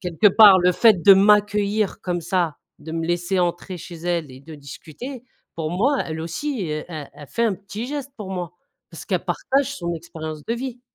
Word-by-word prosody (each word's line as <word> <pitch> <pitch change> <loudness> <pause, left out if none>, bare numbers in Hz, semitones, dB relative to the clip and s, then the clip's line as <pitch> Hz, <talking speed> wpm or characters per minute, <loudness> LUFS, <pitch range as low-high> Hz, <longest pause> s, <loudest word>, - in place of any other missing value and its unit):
quelque 180 +3 +3
part, 200 -1 +8
le 180 0 +3
fait 210 -2 +4
de 200 - +9
m'accueillir 205 +1 +2
comme 175 -1 -2
ça, 170 -2 -1 0.2
de 150 +2 -10
me 165 0 -2
laisser 175 +2 -1
entrer 175 +1 -1
chez 175 0 -9
elle 170 -3 -2
et 130 0 -12
de 155 +3 -11
discuter, 160 - -9 0.3
pour 160 -1 -3
moi, 255 +11 +1
elle 160 0 -5
aussi, 185 - -3
e 155 - -2
e 155 -5 -6
elle 145 - -12
fait 235 - 0
un 220 -4 +1
petit 205 +4 -7
geste 280 0 -5
pour 205 -4 -7
moi, 180 -2 -4 0.4
parce - - -10
qu'elle - - -2
partage 280 +1 0
son 170 -1 -3
expérience 160 -2 -7
de 230 - -1
vie. 250 0 -6
180 Hz, 205 wpm, -22 LUFS, 165-215 Hz, 0.4 s, de